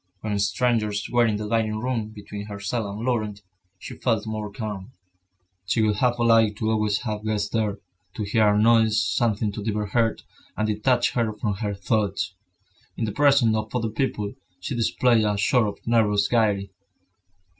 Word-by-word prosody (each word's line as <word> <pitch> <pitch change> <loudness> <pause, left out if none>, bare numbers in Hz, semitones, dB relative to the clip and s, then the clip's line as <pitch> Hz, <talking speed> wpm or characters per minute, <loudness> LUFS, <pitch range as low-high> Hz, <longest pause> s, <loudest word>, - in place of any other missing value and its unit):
When 105 -2 -2
strangers 105 -1 0
were 120 -1 +4
in 110 - 0
the 105 0 -4
dining 110 -1 0
room, 115 -2 -2
between 105 -1 -8
herself 100 +2 -3
and 105 +3 -5
Laurent, 110 -5 -2 0.3
she - - -9
felt 115 -4 0
more 110 -1 -4
calm. 105 +1 -6 0.7
She 110 +2 +2
would 105 -2 +1
have 125 +1 +2
liked 115 -3 +4
to 110 0 0
always 105 -1 +1
have 110 -3 -4
guests 105 -2 -1
there, 105 -3 -1 0.4
to 110 - -3
hear 105 +1 +2
a - - +3
noise, 110 -1 +4
something 105 +3 0
to 105 0 -6
divert 105 -2 -2
her, 115 -1 +2 0.4
and 110 - +1
detach 120 +4 +1
her 115 -3 0
from 105 0 -2
her 100 -1 -3
thoughts. 100 -1 -1 0.6
In 115 - -1
the 105 - -3
presence 140 -4 +4
of 110 +2 -3
other 115 -2 0
people, 105 -3 -2 0.3
she 90 - -4
displayed 120 -1 +2
a 105 -1 +1
sort 110 +2 +3
of 100 - -7
nervous 105 -3 +3
gaiety. 105 -4 +1
110 Hz, 175 wpm, -24 LUFS, 105-115 Hz, 0.7 s, were